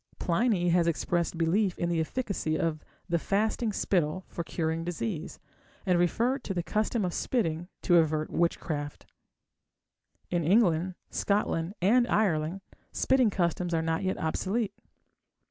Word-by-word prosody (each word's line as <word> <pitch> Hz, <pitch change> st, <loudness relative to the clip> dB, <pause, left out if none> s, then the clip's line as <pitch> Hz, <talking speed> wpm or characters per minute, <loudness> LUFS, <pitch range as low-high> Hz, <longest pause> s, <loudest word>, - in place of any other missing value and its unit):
Pliny 180 Hz, -1 st, +1 dB
has 170 Hz, 0 st, +3 dB
expressed 170 Hz, +1 st, 0 dB
belief 180 Hz, +4 st, +1 dB
in 170 Hz, -, -1 dB
the 170 Hz, -1 st, 0 dB
efficacy 160 Hz, -3 st, -1 dB
of 155 Hz, -2 st, -1 dB, 0.2 s
the 170 Hz, -2 st, +1 dB
fasting 215 Hz, +5 st, 0 dB
spittle 185 Hz, -3 st, 0 dB
for 170 Hz, -, -4 dB
curing 160 Hz, 0 st, -2 dB
disease, 175 Hz, 0 st, -4 dB, 0.5 s
and 180 Hz, -2 st, +3 dB
referred 235 Hz, +9 st, +1 dB
to 195 Hz, -, -3 dB
the 175 Hz, -, -1 dB
custom 215 Hz, +2 st, 0 dB
of 175 Hz, -, -2 dB
spitting 175 Hz, -9 st, -1 dB, 0.2 s
to 175 Hz, -, +5 dB
avert 155 Hz, -1 st, +1 dB
witchcraft. 150 Hz, -3 st, -2 dB, 1.3 s
In 175 Hz, -2 st, +1 dB
England, 180 Hz, -1 st, +3 dB, 0.2 s
Scotland, 200 Hz, -3 st, 0 dB
and 240 Hz, +5 st, +4 dB
Ireland 180 Hz, -4 st, +1 dB, 0.3 s
spitting 260 Hz, -4 st, +3 dB
customs 175 Hz, -2 st, 0 dB
are 160 Hz, -, +1 dB
not 160 Hz, 0 st, 0 dB
yet 190 Hz, -1 st, -1 dB
obsolete. 195 Hz, +6 st, -1 dB
175 Hz, 135 wpm, -29 LUFS, 165-205 Hz, 1.3 s, to